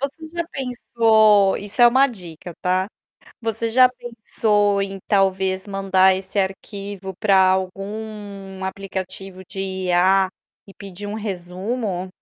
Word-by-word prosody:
Você 290 Hz, +4 st, -5 dB
já 340 Hz, 0 st, -1 dB
pensou 220 Hz, -, +3 dB
isso 205 Hz, +4 st, -5 dB
é -, -, +10 dB
uma 260 Hz, +3 st, +5 dB
dica 175 Hz, -, -9 dB
tá? 185 Hz, 0 st, +1 dB, 0.6 s
Você 225 Hz, 0 st, -2 dB
já 255 Hz, +2 st, +6 dB
pensou 215 Hz, -4 st, 0 dB
em 195 Hz, 0 st, -4 dB
talvez 190 Hz, -1 st, +1 dB
mandar 190 Hz, -1 st, +3 dB
esse 190 Hz, +2 st, -3 dB
arquivo 195 Hz, 0 st, -4 dB
pra 195 Hz, -2 st, +4 dB
algum 195 Hz, 0 st, -5 dB
aplicativo 190 Hz, 0 st, -6 dB
de 195 Hz, -, -5 dB
IA 190 Hz, 0 st, +2 dB, 0.4 s
e 195 Hz, -, -15 dB
pedir 200 Hz, +1 st, -8 dB
um 205 Hz, -, -4 dB
resumo? 190 Hz, 0 st, -4 dB
195 Hz, 125 wpm, -21 LUFS, 190-220 Hz, 0.6 s, é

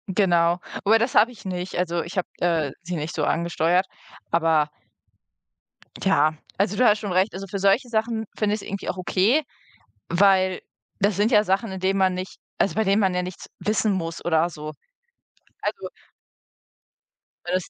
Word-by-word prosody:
Genau. 175 Hz, -3 st, +3 dB, 0.3 s
Aber 220 Hz, +2 st, +6 dB
das 230 Hz, +3 st, -1 dB
habe 225 Hz, +4 st, +5 dB
ich 235 Hz, -, -15 dB
nicht. 180 Hz, 0 st, -4 dB
Also, 175 Hz, -1 st, 0 dB
ich 175 Hz, +4 st, -8 dB
habe, 180 Hz, -, 0 dB
äh, 165 Hz, -5 st, +1 dB
sie 175 Hz, +1 st, -5 dB
nicht 155 Hz, 0 st, -4 dB
so 155 Hz, -, -2 dB
angesteuert, 170 Hz, +3 st, +1 dB, 0.5 s
aber 160 Hz, -2 st, +2 dB, 1.3 s
ja. 155 Hz, -5 st, +2 dB, 0.2 s
Also, 200 Hz, +1 st, 0 dB
du 250 Hz, -, +4 dB
hast 210 Hz, -1 st, +5 dB
schon 205 Hz, -3 st, -4 dB
recht. 185 Hz, +3 st, +2 dB
Also, 195 Hz, +1 st, -6 dB
für 195 Hz, +1 st, -4 dB
solche 200 Hz, +6 st, +2 dB
Sachen 225 Hz, 0 st, -1 dB
finde 210 Hz, -1 st, +1 dB
ich's 215 Hz, -, -7 dB
irgendwie 200 Hz, 0 st, -5 dB
auch -, -, -3 dB
okay, 200 Hz, -, +2 dB, 0.7 s
weil 185 Hz, +1 st, +3 dB, 0.4 s
das 200 Hz, 0 st, +2 dB
sind 210 Hz, +5 st, +2 dB
ja 210 Hz, -3 st, +5 dB
Sachen, 195 Hz, +2 st, 0 dB
in 190 Hz, -, -5 dB
denen 190 Hz, +1 st, +1 dB
man 190 Hz, -1 st, +3 dB
nicht 185 Hz, +1 st, -6 dB, 0.2 s
also, 195 Hz, -, +1 dB
bei 220 Hz, -, +2 dB
denen 200 Hz, +1 st, +2 dB
man 190 Hz, -2 st, +2 dB
ja 180 Hz, -, 0 dB
nichts 180 Hz, 0 st, -8 dB
wissen 215 Hz, +3 st, +1 dB
muss 170 Hz, -3 st, -3 dB
oder 165 Hz, 0 st, +2 dB
so. 155 Hz, -2 st, -7 dB, 0.9 s
Also -, -, -3 dB, 1.6 s
weil 175 Hz, -, -3 dB
das 185 Hz, -, -2 dB
185 Hz, 175 wpm, -24 LUFS, 170-205 Hz, 1.6 s, Aber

